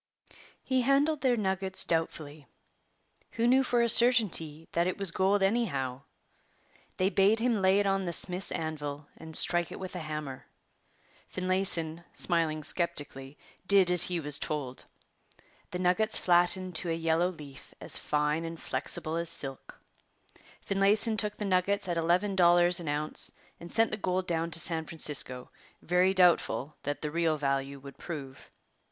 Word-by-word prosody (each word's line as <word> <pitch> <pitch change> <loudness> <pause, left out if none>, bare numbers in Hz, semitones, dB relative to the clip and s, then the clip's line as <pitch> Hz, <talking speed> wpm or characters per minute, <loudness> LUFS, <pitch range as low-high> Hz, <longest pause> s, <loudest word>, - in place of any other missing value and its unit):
He 260 -1 0
handled 280 +4 +1
their 250 -3 +1
nuggets 190 -2 -2
doubtfully. 155 -3 -4 0.9
Who 230 - -1
knew 260 +2 +4
for 240 -2 +1
a - - +2
certainty 210 -11 +3
that 170 +1 0
it 185 - -3
was 195 -3 +1
gold 195 +2 +1
anyhow? 140 - -1 1.0
They 185 +2 0
bade 205 +3 +3
him 230 -3 0
lay 190 +1 +3
it 205 - 0
on 195 -1 0
the 175 - -3
smith's 180 +2 +2
anvil 150 -2 -5
and 160 -1 -9
strike 175 -1 +4
it - - -8
with 185 -1 -8
a - - -4
hammer. 150 -4 -7 0.8
Finlayson, 185 -3 -1
smiling 160 -3 0
sceptically, 145 -4 -3 0.3
did 195 -3 +4
as 180 -2 +10
he 180 -1 -2
was 150 -2 +1
told. 135 -4 -5 0.8
The 180 - -5
nuggets 185 +5 +1
flattened 180 +1 +1
to 175 - -2
a - - 0
yellow 165 +2 0
leaf 145 -6 -12
as - - -2
fine 150 +2 -1
and 165 0 -7
flexible 160 +1 -3
as 170 -1 -3
silk. 135 -5 -5 0.8
Finlayson 205 +3 +1
took 210 -1 -3
the 210 - -4
nuggets 195 +1 0
at 175 -1 -2
eleven 180 +5 0
dollars 175 -1 +4
an 170 - -8
ounce 150 +1 +1 0.3
and 170 - -11
sent 225 0 +3
the 215 - -3
gold 185 -2 -2
down 165 -1 -2
to 165 0 +3
San 160 -1 +1
Francisco, 140 -6 -3 0.3
very 180 +2 +2
doubtful 165 -7 +2
what 145 0 -4
the 150 - -4
real 165 -1 0
value 140 -1 -2
would 140 +1 -13
prove. 140 -6 -9
175 Hz, 160 wpm, -28 LUFS, 155-195 Hz, 1.0 s, as